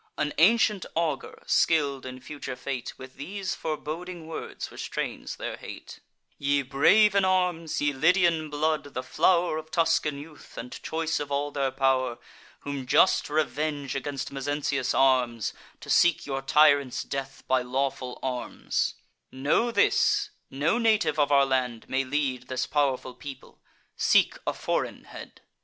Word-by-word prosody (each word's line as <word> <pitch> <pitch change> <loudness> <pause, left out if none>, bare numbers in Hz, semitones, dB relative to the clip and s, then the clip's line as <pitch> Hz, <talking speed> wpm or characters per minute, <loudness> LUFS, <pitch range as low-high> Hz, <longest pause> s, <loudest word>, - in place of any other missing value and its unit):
An 150 - -1
ancient 210 +2 +4
augur, 160 -5 -2
skill'd 140 -5 +2
in 130 0 -8
future 130 0 -7
fate, 130 -1 -5
With 130 0 -12
these 195 +6 -4
foreboding 160 +3 -5
words 160 0 -6
restrains - - -5
their - - -5
hate: - - -10 0.4
'Ye 140 0 +1
brave 155 +11 +5
in 200 -1 +3
arms, 180 -4 +1
ye 145 0 +1
Lydian 165 +1 +3
blood, 150 -1 -1
the 130 - -2
flow'r 170 +3 +2
Of 155 0 -11
Tuscan 160 -3 +1
youth, 150 +1 -12
and 125 +2 -6
choice 160 0 -1
of 145 -1 -5
all 145 +1 -1
their 140 -2 0
pow'r, 130 -2 +1 0.4
Whom 140 -3 -5
just 185 - +4
revenge 150 -2 -1
against 135 0 -4
Mezentius 140 -1 -1
arms, 125 -4 +2 0.3
To - - -10
seek 175 -2 +4
your 135 -1 -3
tyrant's 145 -1 +4
death 135 0 -5
by 130 -1 +3
lawful 130 0 -2
arms; 125 -2 -2 0.4
Know 145 - +1
this: 235 - +2 0.2
no 150 - +1
native 220 -7 +2
of 145 0 +3
our 140 -1 +6
land 125 -4 -1
may 135 +1 0
lead 130 -2 -2
This 130 -1 -2
pow'rful 135 -3 0
people; 135 0 -10 0.3
seek - - +3
a - - +1
foreign - - -2
head. - - -11
145 Hz, 145 wpm, -27 LUFS, 130-160 Hz, 0.4 s, our